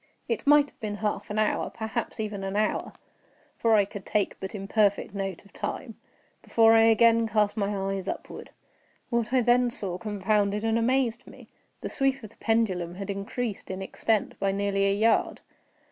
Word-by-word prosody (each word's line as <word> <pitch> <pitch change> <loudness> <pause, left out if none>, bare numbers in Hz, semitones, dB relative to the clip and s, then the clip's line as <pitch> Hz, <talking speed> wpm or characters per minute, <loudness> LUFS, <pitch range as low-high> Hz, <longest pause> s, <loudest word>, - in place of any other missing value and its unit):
It - - -3
might 290 0 +5
have - - -37
been 210 -3 -4
half 210 0 -3
an 210 - -3
hour, 215 -1 +1
perhaps 220 0 -4
even 210 -2 -3
an 195 +1 -3
hour, 215 +1 0 0.6
(for 225 -1 +3
I 205 -2 +4
could 200 -1 -9
take 210 -2 0
but 190 +2 -6
imperfect 200 0 +1
note 195 -2 -4
of 200 - -20
time) 225 -4 -5 0.5
before 225 -1 +4
I 225 0 +6
again 230 0 +5
cast 210 -2 +1
my 200 -2 0
eyes 195 -1 -3
upward. - - -6 0.6
What 235 -1 0
I 260 -1 +4
then 245 +1 +3
saw 185 -6 -4
confounded 205 0 0
and 225 0 +1
amazed 245 0 0
me. - - -14 0.3
The - - -4
sweep 270 -2 0
of 215 - -9
the - - -23
pendulum 190 -7 0
had 200 +1 -4
increased 205 +2 -4
in 190 0 -4
extent 215 +2 -1
by 195 - +1
nearly 195 0 0
a 200 - +2
yard. 220 +2 +2
215 Hz, 180 wpm, -27 LUFS, 200-230 Hz, 0.6 s, I